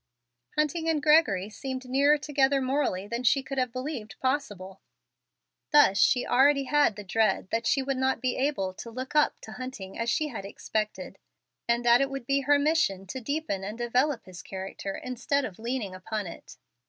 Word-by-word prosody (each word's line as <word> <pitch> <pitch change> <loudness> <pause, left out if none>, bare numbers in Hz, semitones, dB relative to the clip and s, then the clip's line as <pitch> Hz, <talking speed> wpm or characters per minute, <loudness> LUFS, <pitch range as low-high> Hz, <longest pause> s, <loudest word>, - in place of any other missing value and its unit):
Hunting 320 +2 0
and 320 -2 +2
Gregory 290 - +4
seemed 260 +4 -6
nearer 280 +4 +4
together 280 -2 +2
morally 260 -8 0
than 235 +3 -3
she 265 +3 +3
could 270 +1 -4
have 255 -2 0
believed 255 -5 -6
possible. 205 -9 -3 0.9
Thus 290 -10 +5
she 250 - +4
already 275 +3 +4
had 290 -5 +3
the 210 - -7
dread 215 -1 +1
that 230 0 0
she 275 -3 +2
would 270 0 -2
not 260 0 +1
be 255 -2 -1
able 260 -9 -1
to 230 - -9
"look 255 +3 -6
up" 300 - +3
to 220 - -10
Hunting 245 -6 -7
as 230 0 0
she 305 +5 0
had 225 -7 -6
expected, 215 +2 -4 0.5
and 235 +1 +1
that 240 +2 +6
it 275 - +1
would 275 -3 -6
be 275 +2 +2
her 290 +2 +4
mission 285 - +1
to 255 +8 -6
deepen 280 -6 -2
and 210 +3 -5
develop 245 +3 0
his 185 -2 -10
character 195 0 -6
instead 255 +3 -1
of 195 -4 -8
"leaning" 230 -4 -3
upon 210 +3 -4
it. 170 - -10
255 Hz, 185 wpm, -27 LUFS, 210-280 Hz, 0.9 s, that